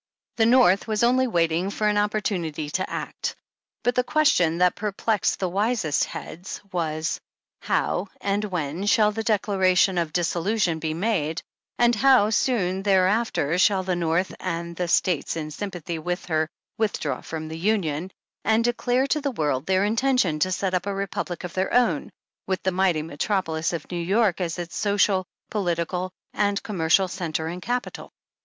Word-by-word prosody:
The 225 -1 +4
North 235 -6 +5
was 215 0 0
only 255 +2 +4
waiting 170 -2 +1
for 210 +1 -1
an 210 - +2
opportunity 180 -8 -1
to 185 +3 -1
act. - - -4 0.5
But 245 - +2
the 250 - +2
question 245 - +3
that 180 0 +4
perplexed 210 0 0
the 185 - 0
wisest 200 - +1
heads 175 +4 -7
was: 160 -3 -2 0.4
How 185 +3 0
and 200 +1 0
when 180 0 -3
shall 210 -2 +4
the 225 +1 -3
Declaration 195 -4 +2
of 165 -2 -1
Dis 175 0 +1
solution 180 -1 0
be 160 0 -2
made, 165 -5 -1 0.3
and 240 0 +4
how 245 -3 +5
soon 195 -6 +1
thereafter 190 -4 +2
shall 190 -1 +4
the 185 -1 -1
North 170 +2 0
and 170 0 -4
the 180 +1 -2
States 175 -2 +1
in 155 -1 -4
sympathy 175 -2 -5
with 180 +3 -3
her 155 -2 0 0.3
with 220 -2 0
draw - - -2
from 160 -1 -6
the 160 +1 -6
Union, 180 -4 0 0.3
and 220 +2 +3
declare 245 +2 +1
to 300 +2 0
the 280 - 0
world 150 - -1
their 190 +1 +3
intention 225 - +2
to 185 +4 +1
set 185 0 -1
up 180 +2 0
a 200 - -1
republic 195 -2 -4
of 180 - -6
their 190 +1 -1
own, 230 -11 +2 0.4
with 190 -1 -2
the 190 - +1
mighty 180 -4 +1
metropolis 165 +1 -1
of 170 -3 -4
New 175 -1 -2
York 195 +1 +2
as 170 -1 -2
its 175 -1 -6
social, 200 -2 +2 0.2
politi 175 -5 0
cal 185 0 -3 0.2
and 205 -1 0
commercial 185 -1 +2
centre 170 -4 -3
and 175 +3 -5
capital 245 +4 -4
185 Hz, 170 wpm, -24 LUFS, 170-210 Hz, 0.5 s, North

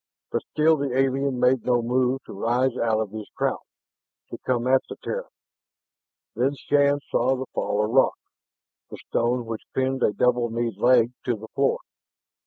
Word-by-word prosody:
But - - 0
still 155 +1 +3
the 140 -3 -2
alien 135 0 +1
made 125 -1 +3
no 120 -2 +2
move 125 +2 +1
to - - -11
rise 120 +5 0
out 110 -2 +1
of 110 -3 -3
his 110 -1 -7
crouch, - - 0 0.7
to - - -7
come 125 -2 -1
at 130 +1 +4
the - - -6
Terran. - - -4 1.1
Then 130 +4 +1
Shann 145 0 +2
saw 130 +3 +2
the 130 0 -4
fall 105 +1 0
of 110 - -4
rock, 135 +2 +3 0.7
the - - -8
stone 120 +1 0
which 115 -1 -5
pinned 130 0 0
a - - +3
double 120 +2 +1
kneed 115 -2 -2
leg 120 0 +4
to 120 - +1
the 110 +1 -11
floor. 135 0 +1
125 Hz, 175 wpm, -24 LUFS, 115-130 Hz, 1.1 s, at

